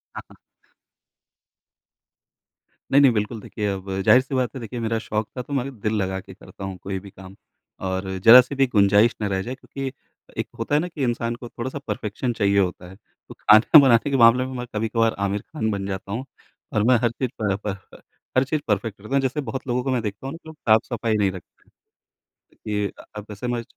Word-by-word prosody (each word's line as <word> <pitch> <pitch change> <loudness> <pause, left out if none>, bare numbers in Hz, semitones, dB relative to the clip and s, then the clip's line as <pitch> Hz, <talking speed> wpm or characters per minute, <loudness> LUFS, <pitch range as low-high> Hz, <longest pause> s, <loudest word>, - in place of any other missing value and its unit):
हाँ, - - -5
हाँ। - - -16 2.6
नहीं-नहीं 140 -2 +6
बिल्कुल 105 +1 -2
देखिए 105 0 -4
अब 95 0 -6 0.2
ज़ाहिर 130 - +7
सी 130 +1 -5
बात 130 +1 -1
है - - -5
देखिए 120 +2 -6
मेरा 115 0 -1
शौक 110 -1 -3
था - - -1
तो 140 +3 -8
मैं 135 -1 0
अ, - - -4
दिल 110 -4 -3
लगा 95 0 -2
के - - -12
करता - - -13
हूँ 95 -1 -6
कोई 95 0 -3
भी 100 +1 -12
काम। 95 0 -13 0.5
और 95 +1 -2 0.2
जरा 125 +2 +12
सी 130 +3 -7
भी 135 -1 +3
गुंजाइश 105 0 +4
ना 105 - 0
रह 95 - 0
जाए 125 +6 -5
क्योंकि 135 0 -6 0.5
एक - - -8
होता 115 +6 0
है 150 - +4
ना 180 - -3
कि 155 -5 -5
इंसान 120 -1 -1
को 120 0 -10
थोड़ा-सा 130 +4 -5
परफेक्शन 110 +3 -3
चाहिए 100 -1 +3
होता 90 -1 -2
है। 95 - -12
तो 105 - -18
खाना 110 +8 +7
बनाने 130 0 +4
के 135 - +2
मामले 120 +2 +6
में 130 - -6
मैं 125 - -4
कभी-कभार 115 +1 +1
आमिर 100 +1 -2
खान 125 -5 -3
बन 100 -1 -3
जाता 95 0 -5
हूँ। 125 +5 -3 0.5
और 105 - +2
मैं 125 +1 +5
हर 120 - +3
चीज़ 125 +1 -3
प 105 - 0
ह - - +1
प - - 0 0.2
अ, - - -12 0.4
हर 130 - +5
चीज़ 150 +2 -2
परफेक्ट 105 0 -1
करता 110 +6 -9
हूँ। 140 - +3
जैसे 135 +3 -1
बहुत 130 +1 -6
लोगों 125 0 0
को 135 - -1
मैं 125 -2 +1
देखता 105 +5 -5
हूँ 140 - -5
ना - - -7
जो 160 - -9
साफ-सफाई 115 -3 +1
नहीं 100 -2 +2
रखते 90 -2 -13
हैं। - - -29 0.8
कि, 105 -1 -3 0.2
अब 105 - -6
जैसे 105 +4 -6
मैं 120 -1 -1
115 Hz, 225 wpm, -23 LUFS, 105-130 Hz, 2.6 s, जरा